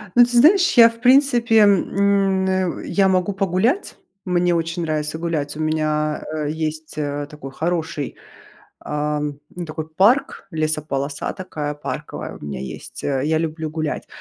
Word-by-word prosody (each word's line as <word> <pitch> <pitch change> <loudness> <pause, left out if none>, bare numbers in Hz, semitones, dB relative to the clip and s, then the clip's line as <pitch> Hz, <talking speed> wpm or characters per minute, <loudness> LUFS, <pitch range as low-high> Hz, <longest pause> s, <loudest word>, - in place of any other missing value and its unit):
Ну, 240 - +8
ты 245 0 -2
знаешь, 355 +9 +6
я 230 -1 +10
в 230 0 -12
принципе, 245 -3 +4
м, 200 -1 +3
э, 185 -2 -1
я 195 -1 +2
могу 185 +1 +1
погулять. 195 - 0 0.3
Мне 180 -1 +1
очень 165 +1 -2
нравится 155 -1 -2
гулять. 155 -4 -2
У - - -6
меня, 155 -1 0
э, 150 -2 -2
есть, 155 0 -4
э, 145 -1 -2
такой 150 -3 -9
хороший, 160 -1 -3 0.6
ам, 150 -1 -3 0.2
ну 175 -1 -5
такой 155 0 -6
парк, 200 - +2
лесополоса 155 -3 -2
такая 150 -5 -5
парковая 150 - -6
у - - -14
меня 70 -2 -5
есть, 65 -1 -8
э, 135 -2 0
я 160 +1 +2
люблю 160 -1 -3
гулять. 155 -1 -3
160 Hz, 150 wpm, -21 LUFS, 150-195 Hz, 0.6 s, я